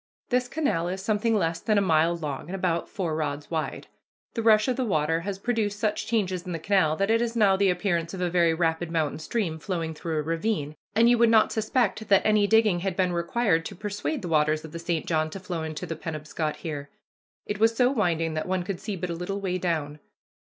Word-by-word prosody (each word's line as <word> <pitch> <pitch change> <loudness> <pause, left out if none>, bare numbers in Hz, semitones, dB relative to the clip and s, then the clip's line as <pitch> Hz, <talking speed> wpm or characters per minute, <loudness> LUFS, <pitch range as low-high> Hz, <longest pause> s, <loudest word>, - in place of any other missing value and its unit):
This 250 0 +1
canal 245 - 0
is 185 +2 -3
something 215 +3 +1
less 165 -4 0
than 215 -1 +1
a - - +6
mile 165 -3 +3
long 150 -3 -5
and 185 - -4
about 175 -3 -1
four 170 -5 -2
rods 150 -1 -3
wide. 160 -2 -3 0.5
The 230 - -2
rush 215 0 +5
of 255 - +1
the 260 - -1
water 165 -6 +1
has 195 +3 -4
produced 210 -1 -1
such 215 -1 -1
changes 190 -6 0
in 180 -1 -5
the - - -2
canal 165 -2 +2
that 195 +5 +1
it 230 +1 +3
has 235 0 -1
now 205 -4 +4
the 195 0 +3
appearance 175 -2 0
of - - -7
a 180 - +1
very 170 -1 +3
rapid 165 0 0
mountain 160 -3 -1
stream 160 -1 -2
flowing 165 -2 -3
through 160 0 -4
a 150 - 0
ravine, 165 -1 -2 0.2
and 230 +2 +5
you 240 -1 +4
would 235 -1 +5
not 220 -1 +5
suspect 220 -1 0
that 195 -1 +5
any 210 -1 +4
digging 220 -4 +4
had 190 0 -2
been 185 -2 +1
required 170 0 +1
to 200 - -6
persuade 210 - -3
the - - -3
waters 155 -1 +2
of 160 - -10
the 170 - -6
St. 165 -1 -2
John 155 -1 0
to 195 - -7
flow 180 -3 -4
into 160 +2 -5
the 165 -1 -4
Penobscot 155 -1 -4
here. 145 -3 -6 0.6
It 205 0 -4
was 225 +1 +4
so 250 +1 +3
winding 170 - 0
that 155 +2 -3
one 185 -1 0
could 180 0 -4
see 210 -1 -4
but 180 -1 -4
a - - -1
little 180 +4 -4
way 185 -2 -2
down. 155 -4 -2
180 Hz, 235 wpm, -26 LUFS, 165-210 Hz, 0.6 s, a